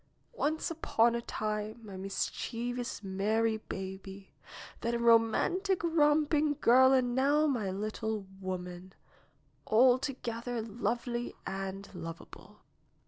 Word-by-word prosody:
'^Once 315 Hz, -6 st, -1 dB
upon 235 Hz, -7 st, +2 dB
a 235 Hz, -, -1 dB
time 215 Hz, 0 st, -3 dB
my 200 Hz, -2 st, -9 dB
mischievous, 230 Hz, +5 st, -3 dB
merry 215 Hz, +4 st, +1 dB
baby, 190 Hz, -1 st, -8 dB, 0.5 s
then 235 Hz, +1 st, -1 dB
a -, -, +1 dB
romantic, 235 Hz, -, +3 dB
romping 300 Hz, -2 st, +3 dB
girl 260 Hz, +1 st, +6 dB
and 255 Hz, -2 st, +3 dB
now 285 Hz, +4 st, +3 dB
my 240 Hz, -9 st, 0 dB
little 215 Hz, +1 st, -3 dB
woman, 185 Hz, -1 st, -6 dB, 0.8 s
alto 255 Hz, +4 st, +4 dB
gether 235 Hz, 0 st, -3 dB
lovely 240 Hz, +2 st, -3 dB
and 195 Hz, +1 st, -5 dB
lovable." 165 Hz, -2 st, -10 dB
230 Hz, 105 wpm, -31 LUFS, 195-260 Hz, 0.8 s, girl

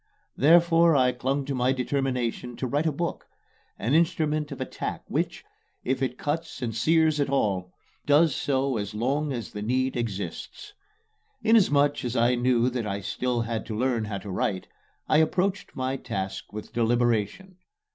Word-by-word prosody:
Therefore, 165 Hz, +2 st, +5 dB
I 130 Hz, -2 st, +4 dB
clung 135 Hz, +3 st, -2 dB
to 140 Hz, -, -3 dB
my 125 Hz, 0 st, +2 dB
determination 125 Hz, -2 st, -2 dB
to 130 Hz, -, -3 dB
write 145 Hz, +5 st, 0 dB
a -, -, +2 dB
book 170 Hz, +3 st, -4 dB, 0.5 s
an 120 Hz, +6 st, -1 dB
instrument 155 Hz, -3 st, +1 dB
of -, -, -6 dB
attack -, -, -4 dB
which, -, -, -2 dB, 0.4 s
if 130 Hz, +1 st, -1 dB
it 130 Hz, -1 st, -1 dB
cuts 160 Hz, -1 st, -3 dB
and 115 Hz, -2 st, -3 dB
sears 160 Hz, +4 st, +3 dB
at 140 Hz, -, +1 dB
all, 95 Hz, -9 st, 0 dB, 0.4 s
does 145 Hz, 0 st, +4 dB
so 135 Hz, -2 st, 0 dB
as 100 Hz, 0 st, -4 dB
long 140 Hz, +6 st, 0 dB
as 120 Hz, -5 st, -5 dB
the 105 Hz, -, -6 dB
need 130 Hz, +4 st, 0 dB
exists. 115 Hz, -, -5 dB, 0.7 s
Inasmuch 145 Hz, -11 st, +4 dB
as 120 Hz, 0 st, -3 dB
I 120 Hz, +1 st, +3 dB
knew 120 Hz, -1 st, +2 dB
that 120 Hz, -3 st, -3 dB
I 100 Hz, 0 st, -3 dB
still 125 Hz, +5 st, -1 dB
had 115 Hz, -1 st, -3 dB
to 110 Hz, -2 st, -4 dB
learn 120 Hz, -2 st, 0 dB
how 105 Hz, -2 st, -4 dB
to 95 Hz, +1 st, -7 dB
write, 95 Hz, 0 st, -2 dB, 0.4 s
I -, -, +4 dB
approached 185 Hz, +5 st, 0 dB
my 130 Hz, +1 st, -2 dB
task 95 Hz, -6 st, -5 dB
with 105 Hz, 0 st, -8 dB
deliberation. 120 Hz, -, 0 dB
130 Hz, 165 wpm, -26 LUFS, 115-150 Hz, 0.7 s, Therefore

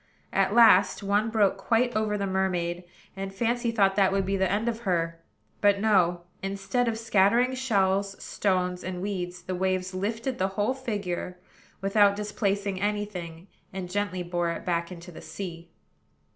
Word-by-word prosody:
At -, -, +2 dB
last 210 Hz, -4 st, +6 dB
one 205 Hz, +3 st, +1 dB
broke 210 Hz, -3 st, +2 dB
quite 230 Hz, +4 st, +1 dB
over 215 Hz, -1 st, 0 dB
the 200 Hz, -, -1 dB
mermaid, 180 Hz, -2 st, -1 dB, 0.3 s
and 195 Hz, 0 st, -5 dB
Fancy 235 Hz, +4 st, 0 dB
thought 200 Hz, -4 st, +3 dB
that 195 Hz, -2 st, +4 dB
would 195 Hz, 0 st, +1 dB
be 195 Hz, +1 st, 0 dB
the 190 Hz, -2 st, +1 dB
end 215 Hz, +4 st, 0 dB
of 230 Hz, -1 st, -1 dB
her. 165 Hz, -6 st, -1 dB, 0.4 s
But, 205 Hz, -1 st, +4 dB
no: 185 Hz, -5 st, +3 dB, 0.2 s
instead 195 Hz, +6 st, -1 dB
of 225 Hz, -1 st, 0 dB
scattering 225 Hz, +3 st, +3 dB
shells, 200 Hz, -6 st, 0 dB
stones, 180 Hz, -2 st, -1 dB
and 185 Hz, -1 st, -4 dB
weeds, 180 Hz, -2 st, -4 dB
the 185 Hz, -, -4 dB
waves 185 Hz, 0 st, -1 dB
lifted 225 Hz, +7 st, -3 dB
the 190 Hz, -, +2 dB
whole 210 Hz, +5 st, +2 dB
figure, 205 Hz, -8 st, -4 dB, 0.4 s
without 200 Hz, +1 st, +4 dB
displacing 200 Hz, -2 st, -2 dB
any 205 Hz, 0 st, 0 dB
thing, 170 Hz, -4 st, -8 dB, 0.3 s
and 185 Hz, -2 st, -6 dB
gently 195 Hz, -2 st, -1 dB
bore 175 Hz, -1 st, -1 dB
it 170 Hz, -, -5 dB
back 170 Hz, 0 st, -1 dB
into 175 Hz, 0 st, -9 dB
the 160 Hz, -, -11 dB
sea. 170 Hz, -3 st, -7 dB
195 Hz, 165 wpm, -27 LUFS, 180-210 Hz, 0.4 s, last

